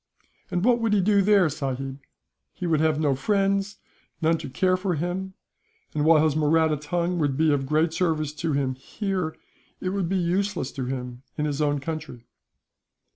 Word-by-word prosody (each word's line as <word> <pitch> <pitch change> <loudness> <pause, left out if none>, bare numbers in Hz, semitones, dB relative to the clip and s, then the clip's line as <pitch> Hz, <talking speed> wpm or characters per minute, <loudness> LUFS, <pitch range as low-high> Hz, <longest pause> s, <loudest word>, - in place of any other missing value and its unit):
"And 180 +3 -1
what 240 -1 +4
would 225 -2 +1
he 210 - +4
do 200 +1 +4
there, 195 -2 +5
sahib? 135 -2 -4 0.5
He 180 - -5
would 160 -3 +2
have 155 -1 +2
no 145 -3 +2
friends, 195 +6 0 0.4
none 165 0 +3
to - - -6
care 185 +8 +2
for 185 -1 -1
him; 180 +4 -3 0.6
and 150 - 0
while 155 0 +6
his 155 -2 +2
Mahratti 155 0 +3
tongue 170 +4 -1
would 145 -4 0
be 155 -1 +3
of 135 -2 -1
great 155 +3 +2
service 155 -4 0
to 155 +1 -2
him, 135 -2 0
here, 185 +4 -3 0.4
it 185 - -2
would 190 -3 -1
be 190 - +1
useless 180 -3 0
to 130 - -4
him 125 -1 -5 0.2
in 150 - 0
his 145 0 -1
own 145 -1 +2
country. 150 -4 -6
160 Hz, 185 wpm, -25 LUFS, 145-185 Hz, 0.6 s, while